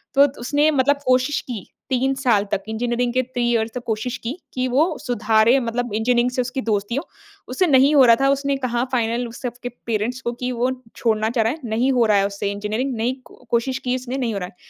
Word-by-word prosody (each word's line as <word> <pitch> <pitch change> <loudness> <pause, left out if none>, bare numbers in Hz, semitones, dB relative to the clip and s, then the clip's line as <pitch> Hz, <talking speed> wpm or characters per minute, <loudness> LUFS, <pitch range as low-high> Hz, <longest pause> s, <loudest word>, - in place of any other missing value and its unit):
तो 280 +1 +7
त 280 - -12
उसने 290 +5 +2
मतलब 285 0 +2
कोशिश 255 +3 +2
की 230 -7 -5 0.2
3 265 +1 +1
साल 240 -7 +2
तक 200 - -1
इंजीनियरिंग 240 +2 -1
के 255 - +3
3 245 -1 -3
इयर्स 225 -1 0
तक 250 - -5
कोशिश 235 +3 -2
की, 230 - -5 0.2
कि 255 0 -1
वो 305 +6 +1
सुधारे 225 +1 +3
मतलब 240 -2 -3
इंजीनियरिंग 240 +2 +2
से 250 - 0
उसकी 250 +2 -3
दोस्ती 210 +1 -1
हो। 280 - -1 0.5
उससे 340 +8 +1
नहीं 275 +1 +5
हो 270 -3 +7
रहा 230 - +7
था। 275 - +4
उसने 280 0 +1
कहा 245 -2 -1
फाइनल 240 -1 0
उस 230 - -11
सबके 245 0 -5 0.2
पेरेंट्स 230 +3 -2
को 240 - -2
कि 250 +1 -4
वो 250 +1 0 0.2
छोड़ना 220 -1 +1
चाह 230 -2 +1
रहा 225 - +1
है। 320 - -10
नहीं 235 +5 +1
हो 240 -2 +3
रहा 210 -2 +4
है 195 - +3
उससे 200 0 -3
इंजीनियरिंग, 215 +6 -2
नहीं 240 +4 0
को-कोशिश 245 +1 -2
की 250 0 +1
उसने 255 +1 -4
नहीं 240 -4 -1
हो 200 - -2
रहा 180 - -4
है। - - -22
245 Hz, 235 wpm, -21 LUFS, 225-260 Hz, 0.5 s, तो